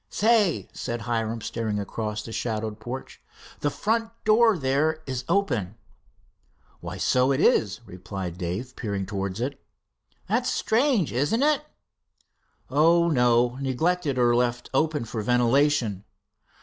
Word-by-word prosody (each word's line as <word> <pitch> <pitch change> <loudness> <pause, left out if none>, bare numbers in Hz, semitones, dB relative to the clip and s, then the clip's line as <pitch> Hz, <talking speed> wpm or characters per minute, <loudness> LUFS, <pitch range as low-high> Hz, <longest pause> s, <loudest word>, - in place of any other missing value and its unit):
"Say," 215 -5 +2
said 120 0 -4
Hiram, 115 0 -2
staring 110 -2 -3
across 105 +1 -4
the 115 - -8
shadowed 110 -2 -3
porch, 120 +4 -7 0.4
"the 145 - 0
front 225 +7 -1
door 220 -1 +4
there 155 +3 0
is 130 -2 -4
open." 125 - 0 1.0
"Why, - - -7
so 130 +1 +2
it 135 - +1
is," 105 +1 +2
replied 90 -2 -7
Dave, 100 +9 -4
peering 100 -4 -3
towards 100 0 -4
it. 135 +3 -4 0.6
"That's 235 +5 +1
strange, 230 - +1
isn't 145 - +1
it?" 300 0 +2 1.1
"Oh, 170 +4 +4
no 125 -1 +3
neglected, 145 +2 0
or 120 -1 +4
left 120 0 -1
open 150 -2 +1
for 110 0 -4
ventilation." 125 -2 +2
125 Hz, 125 wpm, -25 LUFS, 110-160 Hz, 1.1 s, door